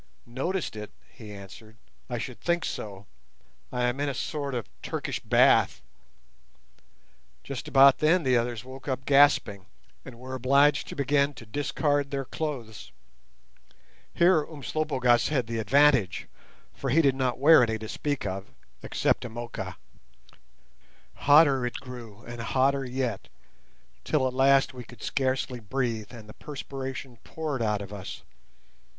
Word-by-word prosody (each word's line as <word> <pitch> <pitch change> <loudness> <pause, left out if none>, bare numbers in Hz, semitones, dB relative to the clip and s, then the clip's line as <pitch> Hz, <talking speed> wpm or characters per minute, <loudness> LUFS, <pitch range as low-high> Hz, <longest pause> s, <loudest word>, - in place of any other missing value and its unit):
"Noticed 135 - -3
it!" 105 -1 -7 0.2
he 110 -5 -11
answered; 105 +3 -12 0.3
"I 120 - -2
should 120 +1 -6
think 175 -1 0
so. 100 -1 -6 0.7
I 125 -1 -1
am 125 +2 0
in 145 0 0
a 135 - -4
sort 140 +1 -3
of 120 - -4
Turkish - - -4
bath." - - +3 1.6
Just 140 -3 -6
about 135 0 +6
then 165 +3 +3
the 130 -2 +3
others 120 -1 -1
woke 130 +2 -11
up 130 -1 -3
gasping, 135 -9 +4 0.4
and 125 -3 -11
were 130 +2 -8
obliged 135 +2 +3
to - - -7
begin 140 0 +1
to 115 - -11
discard 145 +4 -1
their 135 -1 -3
clothes. 125 -9 -5 1.2
Here 170 -3 +4
Umslopogaas 140 -5 0
had 135 -5 0
the 115 0 -3
advantage, 130 -3 +3 0.5
for 135 - -4
he 160 +6 +4
did 135 -2 +4
not 130 -2 -1
wear 150 +3 +7
any 115 -2 +1
to 110 0 -8
speak 145 +2 -3
of, 95 0 -4 0.3
except - - 0
a 120 - -5
moocha. 120 +1 -6 1.4
Hotter 145 -2 +5
it 125 - -3
grew, 120 -5 -10
and 120 0 -7
hotter 135 +3 +1
yet, 125 -4 -3 0.8
till 145 -4 +1
at 130 - -4
last 135 +1 +4
we 125 -1 -8
could 120 +1 -14
scarcely 130 -2 -1
breathe, 115 -1 -3
and 115 -4 -11
the 105 - -11
perspiration 135 -3 -7
poured 150 -5 -4
out 105 -2 0
of 100 +1 -10
us. 100 -2 -8
130 Hz, 145 wpm, -27 LUFS, 115-140 Hz, 1.6 s, wear